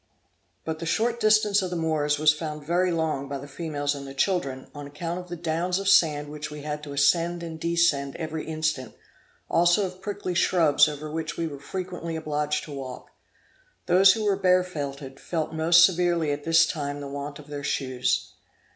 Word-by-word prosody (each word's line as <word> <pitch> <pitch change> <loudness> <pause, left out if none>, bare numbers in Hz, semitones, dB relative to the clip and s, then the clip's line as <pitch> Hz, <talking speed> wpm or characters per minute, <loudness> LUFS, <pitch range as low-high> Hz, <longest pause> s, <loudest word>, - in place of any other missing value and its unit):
But 160 -1 -3
the 165 - -5
short 235 +6 0
distance 215 -2 +4
of 185 - -3
the 180 - -4
Moors 155 -3 0
was 155 0 +5
found 150 -1 -6
very 175 +3 +1
long 155 -4 -1
by 140 - -3
the 140 +1 -9
females 145 -1 -3
and 140 -1 -7
the 135 - -9
children, 135 -5 -1
on 145 -1 -8
account 165 +5 -4
of 180 - -9
the 175 - -4
downs 170 +2 -1
of 195 0 -3
sand 150 -6 +4
which 150 0 -6
we 150 -1 -8
had 150 0 -4
to 145 -1 -8
ascend 170 +5 +2
and 160 -1 -7
descend 165 -5 +1
every 160 -1 -5
instant, 155 -4 -2 0.5
also 175 +4 +3
of 185 0 -8
prickly 205 -3 -4
shrubs 160 -4 +4
over 150 0 -6
which 160 0 -4
we 170 - -1
were 145 -3 -6
frequently 180 +1 -5
obliged 150 -1 -1
to 155 - -10
walk. 130 -2 -8 0.7
Those 190 +2 +6
who 220 - -3
were 205 -2 +2
barefooted, 150 -8 -1
felt 160 -2 -3
most 170 +2 +6
severely 175 -4 +1
at 145 0 -4
this 165 0 +5
time 145 -3 -4
the 140 - -6
want 140 +1 -6
of 150 - -12
their 145 -1 -7
shoes. 125 -10 -1
160 Hz, 190 wpm, -26 LUFS, 145-175 Hz, 0.7 s, Those